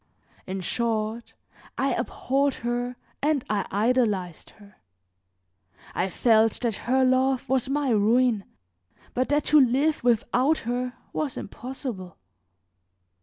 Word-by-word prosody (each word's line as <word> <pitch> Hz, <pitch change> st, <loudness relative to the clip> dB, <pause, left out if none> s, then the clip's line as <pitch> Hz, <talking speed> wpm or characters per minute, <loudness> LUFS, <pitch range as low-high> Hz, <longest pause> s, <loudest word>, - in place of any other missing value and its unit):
In 190 Hz, 0 st, -4 dB
short, 225 Hz, +3 st, -2 dB, 0.4 s
I -, -, +1 dB
abhorred 275 Hz, +1 st, 0 dB
her 245 Hz, +1 st, -2 dB, 0.3 s
and 295 Hz, -3 st, +1 dB
I 200 Hz, -3 st, -1 dB
idolized 205 Hz, -5 st, 0 dB
her; 205 Hz, -2 st, -18 dB, 1.2 s
I 190 Hz, -, -1 dB
felt 225 Hz, +3 st, +3 dB
that 235 Hz, -4 st, 0 dB
her 260 Hz, +1 st, +4 dB
love 260 Hz, 0 st, +2 dB
was 260 Hz, 0 st, +1 dB
my 280 Hz, -2 st, 0 dB
ruin, 225 Hz, 0 st, +3 dB, 0.7 s
but 255 Hz, +1 st, 0 dB
that 295 Hz, 0 st, +2 dB
to 300 Hz, -, +8 dB
live 275 Hz, +4 st, +2 dB
without 245 Hz, +5 st, +2 dB
her 245 Hz, +1 st, -2 dB, 0.2 s
was 295 Hz, -4 st, -2 dB
impossible. 240 Hz, -, -7 dB
245 Hz, 115 wpm, -25 LUFS, 215-265 Hz, 1.2 s, to